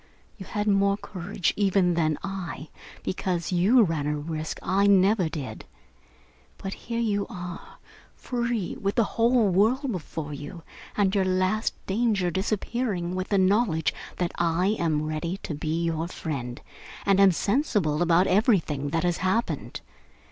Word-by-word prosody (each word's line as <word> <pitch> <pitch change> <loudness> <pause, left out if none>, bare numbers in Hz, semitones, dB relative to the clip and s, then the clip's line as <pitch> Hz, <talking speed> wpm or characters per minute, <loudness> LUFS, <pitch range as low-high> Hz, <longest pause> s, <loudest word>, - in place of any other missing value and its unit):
You 190 - -10
had 210 -1 -2
more 200 0 +3
courage, 185 -2 -2
even, 195 -3 +2
than 155 -3 +1
I, 185 -5 -5 0.3
because 180 -2 -2
you 200 +8 +5
ran 160 -6 -1
a 150 0 0
risk 155 +1 -4
I 200 +2 +2
never 195 -2 +4
did. 145 -5 -6 0.9
But 195 0 -5
here 230 0 -5
you 205 -3 0
are, 180 -5 -8 0.4
free, 235 -5 -2
with 200 0 -1
the 235 - +4
whole 230 0 +2
world 235 +9 +2
before 160 -5 -5
you, 145 +4 -8 0.3
and 195 -2 +2
your 200 -2 +3
last 185 +4 +1
danger 200 -3 +1
disappearing 195 -1 -1
with 185 0 -2
the 200 - +2
knowledge 190 -4 +2 0.2
that 175 -1 -1
I 175 +5 +2
am 155 -3 +1
ready 155 +4 -3
to - - -4
be 155 +3 -2
your 165 0 -1
friend 130 -8 -5 0.5
and 195 -1 +4
am 195 -1 +7
sensible 200 - +1
about 175 +1 +4
everything 180 - +2
that 165 +2 0
has 175 -1 +1
happened. 190 +6 -1
185 Hz, 150 wpm, -26 LUFS, 165-205 Hz, 0.9 s, am